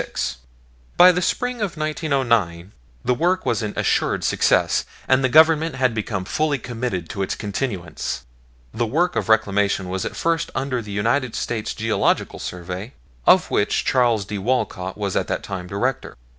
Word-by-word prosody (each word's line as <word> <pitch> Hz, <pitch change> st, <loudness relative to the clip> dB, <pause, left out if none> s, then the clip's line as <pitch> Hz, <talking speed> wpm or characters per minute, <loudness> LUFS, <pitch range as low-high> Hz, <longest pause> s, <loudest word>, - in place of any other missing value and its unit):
By 180 Hz, +1 st, +9 dB
the 180 Hz, 0 st, -1 dB
spring 245 Hz, +5 st, -1 dB
of 190 Hz, -5 st, -2 dB
1909 120 Hz, -, 0 dB, 0.3 s
the 125 Hz, -, +3 dB
work 180 Hz, +8 st, +1 dB
was -, -, 0 dB
an 105 Hz, -1 st, -3 dB
assured -, -, +1 dB
success, -, -, +2 dB, 0.2 s
and 130 Hz, 0 st, +3 dB
the 130 Hz, -, +3 dB
Government 160 Hz, +1 st, +5 dB
had 130 Hz, -2 st, +1 dB
become 105 Hz, -3 st, -3 dB
fully 150 Hz, +7 st, 0 dB
committed 115 Hz, -8 st, -4 dB
to 100 Hz, -, -4 dB
its 95 Hz, -, -1 dB
continuance. 100 Hz, -, -4 dB, 0.5 s
The 120 Hz, -, -1 dB
work 170 Hz, +9 st, +1 dB
of -, -, -1 dB
Reclamation 100 Hz, -3 st, +2 dB
was 95 Hz, 0 st, -2 dB
at -, -, -4 dB
first 165 Hz, -1 st, 0 dB
under 130 Hz, -2 st, -1 dB
the 105 Hz, -, -11 dB
United 115 Hz, +5 st, 0 dB
States 115 Hz, -3 st, -3 dB
Geological 110 Hz, 0 st, 0 dB
Survey, 90 Hz, +6 st, -6 dB, 0.3 s
of -, -, +5 dB
which -, -, +1 dB
Charles 120 Hz, -5 st, +2 dB
D. 105 Hz, +1 st, -4 dB
Walcott 95 Hz, -5 st, -1 dB
was 100 Hz, -2 st, -2 dB
at -, -, 0 dB
that -, -, -2 dB
time 90 Hz, -2 st, -5 dB
Director. 100 Hz, -, -2 dB
115 Hz, 160 wpm, -22 LUFS, 100-140 Hz, 0.5 s, By